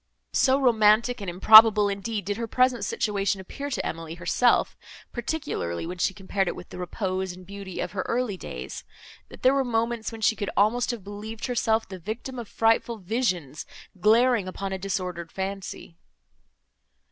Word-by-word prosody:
So 265 0 +3
romantic 230 -1 +3
and 195 - -4
improbable, 215 +3 +8
indeed, 200 0 -3
did 205 +1 -2
her 230 0 -3
present 250 -1 +2
situation 200 -1 -1
appear 280 +9 -6
to 270 - -3
Emily 165 0 -5
herself, 180 +8 +2 0.4
particularly 240 - -3
when 180 +1 -6
she 190 - +2
compared 195 0 -2
it - - -2
with 180 - -11
the - - -9
repose 185 0 -3
and 180 0 -13
beauty 195 -1 -8
of 180 - -3
her 190 0 -2
early 235 -4 -1
days, 65 - -7 0.5
that - - -14
there 260 +1 +5
were 275 -1 +2
moments, 230 -1 -1
when 225 -1 -9
she 220 - +3
could 205 -2 -3
almost 230 +4 +2
have 235 -5 -3
believed 210 +3 -7
herself 225 -3 0
the 190 -2 -8
victim 225 +7 -6
of 235 - -7
frightful 225 +1 +1
visions, 185 - -2 0.3
glaring 225 +1 +4
upon 195 +1 -4
a 190 - -4
disordered 180 -3 -4
fancy. 190 -3 -6
205 Hz, 170 wpm, -26 LUFS, 185-235 Hz, 0.5 s, improbable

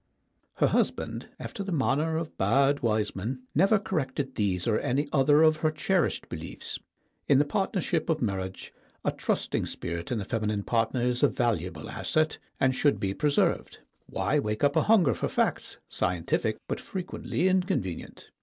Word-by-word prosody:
Her - - +2
husband, - - 0
after - - -6
the 195 - -5
manner 155 +1 +1
of 165 -1 -4
bad 135 +8 +3
wise 110 -3 0
men, 125 +7 -4
never 195 +8 +4
corrected 140 -8 -2
these 95 -6 0
or 110 -2 +2
any 140 +4 0
other 145 +2 +5
of 155 -1 +5
her 155 - +1
cherished 170 +3 0
beliefs. - - -6 0.5
In 140 - +5
the 145 - +4
partnership 175 0 -1
of 160 -1 +2
marriage 95 -6 -3 0.3
a - - +3
trusting - - -1
spirit 85 +2 -5
in 120 - 0
the 100 - -3
feminine 105 -2 -1
partner 115 +2 0
is 125 0 +1
a - - +6
valuable 90 -9 -1
asset, 155 0 0 0.2
and 130 0 +3
should 145 +2 +2
be 95 -1 -1
preserved. 145 +5 +1 0.3
Why 150 - 0
wake 105 -3 -2
up 145 - +3
a - - +5
hunger 205 -9 +4
for - - -2
facts, - - -1
scientific 90 -2 -1
but - - -2
frequently 185 -1 -2
inconvenient? 185 - -1
135 Hz, 165 wpm, -28 LUFS, 105-155 Hz, 0.5 s, a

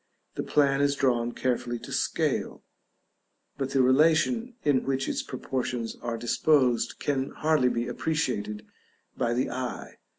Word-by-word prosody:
The - - -3
plan 140 -1 +2
is 140 0 +2
drawn 120 -3 +1
carefully 120 -1 -1
to - - -10
scale, - - -1 1.0
but 135 -1 -1
the 135 -1 +3
relation 165 - +3
in 140 -3 +2
which 135 0 -1
its - - -1
proportions 125 -2 -3
are 120 -1 -3
disposed 120 0 +2
can 135 -2 -1
hardly 155 -5 +2
be 120 0 -2
appreciated 120 -10 -2 0.5
by 120 0 0
the 125 - 0
eye. 130 0 -5
130 Hz, 135 wpm, -27 LUFS, 120-145 Hz, 1.0 s, the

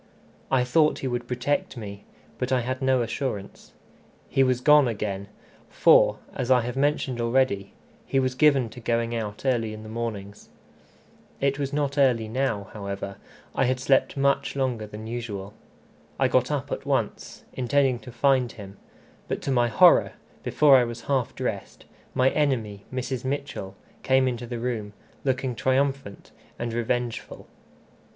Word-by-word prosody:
I 130 -2 +3
thought 150 +5 +3
he - - +1
would 120 -1 -3
protect 125 +2 -1
me, 100 -2 -8 0.3
but 125 - -2
I 130 -1 +3
had 130 +2 -3
no 130 -2 +3
assurance. 115 -4 -5 0.6
He 135 - +2
was 130 -2 +3
gone 150 0 +6
again, 100 -3 -3 0.4
for, - - +5 0.2
as 125 -1 -3
I 125 -1 +5
have 120 +2 -4
mentioned 135 -3 0
already, 115 -5 +1 0.3
he 135 - +2
was 130 -1 0
given 135 -2 +4
to 120 - -11
going 115 0 -1
out 110 0 -4
early 115 -4 0
in 110 - -10
the 110 - -9
mornings. 110 -3 -5 0.9
It 140 +1 0
was 140 -1 -2
not 145 -1 -1
early 120 -5 +3
now, 110 -4 -2
however; 100 -1 -5 0.4
I 135 - +2
had 130 +1 0
slept 135 +2 +2
much 140 0 +1
longer 125 -5 -1
than 105 +1 -9
usual. 110 -4 -5 0.7
I - - +4
got - - +2
up - - -2
at - - -3
once, - - -2
intending 130 0 +1
to 125 - -11
find 130 0 +2
him; 100 -2 -11 0.5
but, - - -2
to 140 - -1
my 120 -2 +3
horror, 110 -2 +5 0.3
before 145 -3 +5
I 125 - +4
was 120 0 -5
half 130 -2 -1
dressed, 105 -6 -5 0.3
my 130 +1 +4
enemy, 115 -9 -1
Mrs. 130 -1 -3
Mitchell, 130 -8 -4 0.3
came 130 0 +3
into 120 -1 -3
the 120 0 -4
room, 115 -4 -3 0.3
looking 130 -1 0
triumphant 130 -3 -1 0.3
and 120 -1 -3
revengeful. 120 0 -3
125 Hz, 160 wpm, -25 LUFS, 110-135 Hz, 0.9 s, gone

